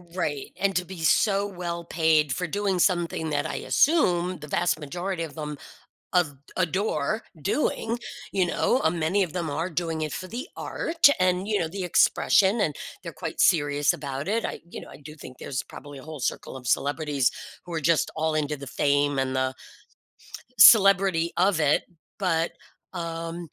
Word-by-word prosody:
Right, 145 -6 -3
and 195 0 +1
to 180 - -1
be 185 -1 -9
so 200 +4 +3
well 175 -3 -5
paid 160 -3 +2
for 180 +7 -2
doing 200 +1 -1
something 175 -3 +1
that 145 0 0
I - - -3
assume 185 - +2
the 150 - -10
vast 170 +2 0
majority 175 +4 -4
of 160 - -8
them 150 -2 -5 0.6
of 170 -6 +2 0.2
adore 195 +4 0 0.2
doing. 230 - -1 0.3
You 185 -2 +2
know? 250 +8 +1
A 160 - +4
many 175 +4 +1
of 170 - -9
them 170 -3 -3
are 160 +5 -2
doing 165 -1 -3
it 155 -2 -3
for 185 - -5
the 250 - -5
art 330 -2 +2
and, 185 +1 +2
you 210 -1 +1
know, 165 - 0
the 190 +4 -5
expression, 195 +4 +3
and 155 -8 0 0.3
they're - - -7
quite - - -5
serious 145 -3 +3
about 140 +2 -5
it. 225 +2 0
I, - - -4
you - - -7
know, - - -12
I - - -12
do 150 +1 -11
think 130 -4 -12
there's 130 -2 -4
probably 145 -1 -11
a 130 - -12
whole 155 -2 -8
circle 130 - -3
of 125 -2 -7
celebrities 145 -2 +1 0.3
who 175 - -9
are 165 - -1
just 160 +1 +2
all 160 0 0
into 150 -1 -1
the 140 - -9
fame 145 -1 +1
and 130 0 0
the 130 0 0 1.0
celebrity 195 -5 +7
of 185 -2 +3
it. 150 -1 +3 0.3
But, 170 -3 0 0.4
um, 165 -1 -5
165 Hz, 180 wpm, -26 LUFS, 150-185 Hz, 1.0 s, celebrity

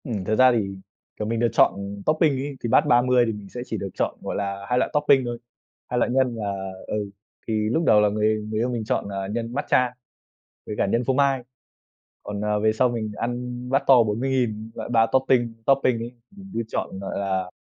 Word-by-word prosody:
Ừm, 110 - -3
thật 110 - +1
ra 130 +2 +6
thì, 100 -5 -1 0.4
kiểu, 105 - -3
mình 115 0 -1
được 120 - +3
chọn - - +5 0.3
topping 155 -1 +3
ấy, 140 +1 -4
thì 120 - -1
bát 125 - +4
30 125 0 +4
thì 115 - -1
mình 105 -2 -9
sẽ 120 - -6
chỉ 115 - -4
được 100 - -4
chọn, - - -1
gọi - - -4
là, 100 0 -3
hai 125 0 +2
loại - - +1
topping 140 -3 +4
thôi, 120 0 -3 0.5
2 125 - -1
loại 120 - +1
nhân 130 -2 +2
là 100 -3 -4 0.2
ừ, 105 -1 -3 0.4
thì 110 -1 0
lúc 160 +9 +1
đầu 105 - +6
là 105 - +4
người 110 +1 +1
người 110 0 -2
yêu 120 +2 +1
mình 120 -3 -2
chọn - - -1
là 95 -1 -4
nhân 115 +3 -4
matcha 125 -2 +1 0.7
với 105 - -4
cả - - +2
nhân 115 +5 0
phô 135 - +1
mai. 135 -1 +2 0.8
Còn, 105 0 -5
à, 105 0 +1
về 110 +1 +2
sau 125 +3 +2
mình 110 -3 -3
ăn 125 +1 -4
bát 135 +1 +2
to 130 -3 +7
40.000 115 -1 -1
loại - - -6
3 115 -2 +4
topping 130 -3 +2
topping 135 -3 +3
ấy, 120 +2 -6 0.4
cứ 115 - -1
chọn, 95 - -4
gọi 100 - -4
là, 95 -2 -1
115 Hz, 220 wpm, -24 LUFS, 105-125 Hz, 0.8 s, to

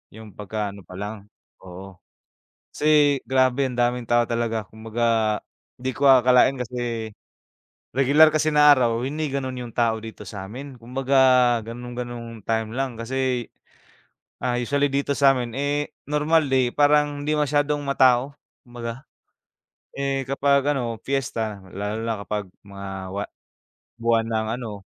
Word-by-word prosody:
yung 110 -2 -11
pagka 105 0 -4
ano 100 - -12
pa 90 - -11
lang, 105 +1 -7 0.3
oo. 95 0 -11 0.7
Kasi 150 -2 +3
grabe 130 +1 +2
ang 125 - -7
daming 120 0 +1
tao 120 0 +2
talaga, 115 -3 -2
kumbaga 110 -1 0 0.4
hindi 130 +1 -2
ko 140 - -1
akalain 130 0 +6
kasi 120 -2 -3 0.9
regular 145 +4 +6
kasi 155 0 +1
na 150 0 +6
araw 120 -3 +1
hindi 150 +1 -2
gano'n 130 -2 -3
yung 115 - -11
tao 115 -2 +1
dito 115 -1 -10
sa'min. 120 +7 -8
Kumbaga 130 +3 -1 0.5
gano'n 120 +1 -8
gano'ng 120 -1 -5 0.2
time 110 -1 -1
lang 135 -2 -1
kasi, 125 0 -2 0.9
ah, 120 -1 0
usually 140 +3 +1
dito 140 +1 0
sa'min, 130 -4 +2
eh, 145 +2 -2 0.2
normal 150 +1 +2
day 130 -2 +2
parang 145 0 +3
hindi 150 +1 0
masyadong 145 0 +1
ma-tao 130 0 +3 0.3
kumbaga. 120 +1 -7 0.9
Eh, 135 -1 -2
kapag 140 +1 +2
ano 120 -4 -3
piyesta, 115 -7 -3
lalo 105 +3 -4
na 115 -1 -1
kapag 105 -1 -2 0.2
mga 100 0 -8 0.3
wa 100 - -2 0.8
buwan 115 -1 +2
ng 110 -1 -1
ano 105 -5 -7
125 Hz, 135 wpm, -23 LUFS, 115-140 Hz, 0.9 s, akalain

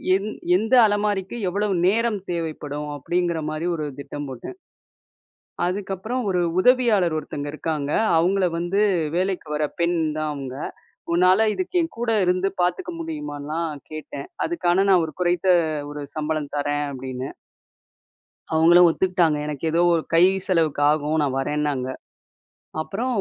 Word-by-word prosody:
எ - - +4 0.4
எந்த 220 +5 -2
அலமாரிக்கு 205 -1 0
எவ்வளவு 200 +1 0
நேரம் 225 0 +1
தேவைப்படும் 150 -3 -4
அப்டிங்கிற 170 +2 -1
மாரி 155 +2 -3
ஒரு 155 -2 -3
திட்டம் 145 0 -6
போட்டேன். 130 - -8 1.1
அதுக்கப்பறம் 195 +6 -3
ஒரு 180 -2 +1 0.2
உதவியாளர் 225 -8 +4
ஒருத்தங்க 145 -1 -5
இருக்காங்க. 150 -2 -3 0.3
அவுங்கள 185 +3 +2
வந்து 175 +4 0 0.4
வேலைக்கு 185 -3 -1
வர 150 - 0 0.2
பெண் 170 0 +2 0.2
தான் 155 -1 -1
அவுங்க. 135 -2 -6 0.6
உன்னால 185 +5 +4
இதுக்கு 370 0 -4
என் 330 - -5
கூட 235 -1 -1
இருந்து 185 +2 +2
பாத்துக்க 340 - 0
முடியுமான்லா 170 - -4 0.3
கேட்டேன். 155 - -7 0.2
அதுக்கான 195 - +1
நான் 185 -3 +5
ஒரு 155 - -6
குறைத்த 175 +1 +1 0.4
ஒரு 145 0 -6
சம்பளம் 155 -1 -2
தரேன் 145 0 0
அப்டின்னு. 130 -1 -5 1.2
அவுங்களும் 175 +2 +7
ஒத்துக்கிட்டாங்க. 175 -3 +2
எனக்கு 150 0 -5
ஏதோ 170 - +3
ஒரு 165 - +1
கை 165 - +6 0.2
செலவுக்கு 160 -5 +1
ஆகும் 150 +1 0
நான் 135 -2 -1
வரேன்னாங்க. 145 -2 -1 0.9
அப்பறோ 200 +10 -3
170 Hz, 130 wpm, -23 LUFS, 150-195 Hz, 1.2 s, அவுங்களும்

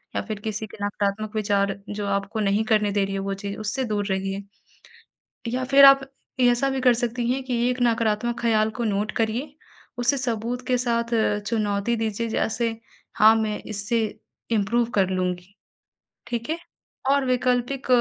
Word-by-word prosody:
या - - +1
फिर 215 -2 -4
किसी 215 0 -3
के - - -13
नकारात्मक 205 +1 -2
विचार 200 -2 +1
जो 205 0 -4
आपको 200 +2 -2
नहीं 205 +1 +2
करने 210 -2 +2
दे 200 -1 +2
रही 195 0 -4
हो 195 - -2
वो 195 - -1
चीज़, 200 0 -6
उससे 215 +5 -2
दूर 210 -2 -1
रहिए 195 0 -2 1.1
या 255 +1 -1
फिर 275 +1 +7
आप 275 0 +8 0.4
ऐसा 245 +2 +3
भी 265 -1 -2
कर 250 -1 +5
सकती 240 0 -2
हैं 265 +1 -1
कि 255 -1 -2
एक 250 - -1
नकारात्मक 230 0 +1
ख़्याल 220 -2 +2
को 240 - -1
नोट 210 +1 0
करिए 235 +6 -1 0.5
उसे 265 +4 +2
सबूत 245 -1 -2
के 255 -1 +2
साथ 235 -1 0
अ, 220 -2 +2
चुनौती 205 +1 -1
दीजिए 225 0 -2
जैसे 225 +1 0 0.5
हाँ 220 0 +7
मैं 215 -1 -1
इससे 215 +2 -1 0.5
इम्प्रूव 230 +2 +2
कर 190 -2 +3
लूँगी। 180 0 -2 0.7
ठीक 235 +2 -4
है? 320 - 0 0.5
और 280 -1 +3
वैकल्पिक 250 +1 0
220 Hz, 170 wpm, -24 LUFS, 205-245 Hz, 1.1 s, आप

